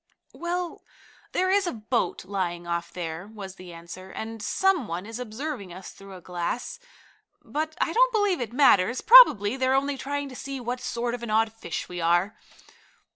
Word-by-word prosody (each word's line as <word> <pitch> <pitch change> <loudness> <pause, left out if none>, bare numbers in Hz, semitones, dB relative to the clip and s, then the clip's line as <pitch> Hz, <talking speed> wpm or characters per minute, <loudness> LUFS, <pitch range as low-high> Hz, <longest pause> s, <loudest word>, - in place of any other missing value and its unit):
"Well, 350 0 -4 0.5
there 370 +1 +1
is 395 -1 +3
a - - 0
boat 225 -2 -2
lying 180 -3 -3
off 170 0 -3
there," 170 +1 -5
was 205 -3 -9
the 185 -2 -12
answer. 170 +3 -10
"And 220 +2 -6
some 360 - +1
one 175 +2 -4
is 225 +2 -7
observing 245 - -5
us 185 +2 -9
through 195 -1 -12
a 180 - -11
glass. 180 - -4 0.6
But 310 +1 -3
I 330 - 0
don't - - +4
believe 410 - +1
it 230 -3 -3
matters. 240 -4 +4
Probably 265 - +8
they're 260 0 +2
only 275 0 0
trying 285 +1 -3
to 255 - -10
see 275 +1 -6
what 245 +1 -4
sort 235 -1 -2
of 245 - -5
an 235 - -5
odd 220 +1 +2
fish 225 -6 -5
we 175 -1 -6
are." 175 +5 +2
225 Hz, 180 wpm, -26 LUFS, 185-285 Hz, 0.6 s, Probably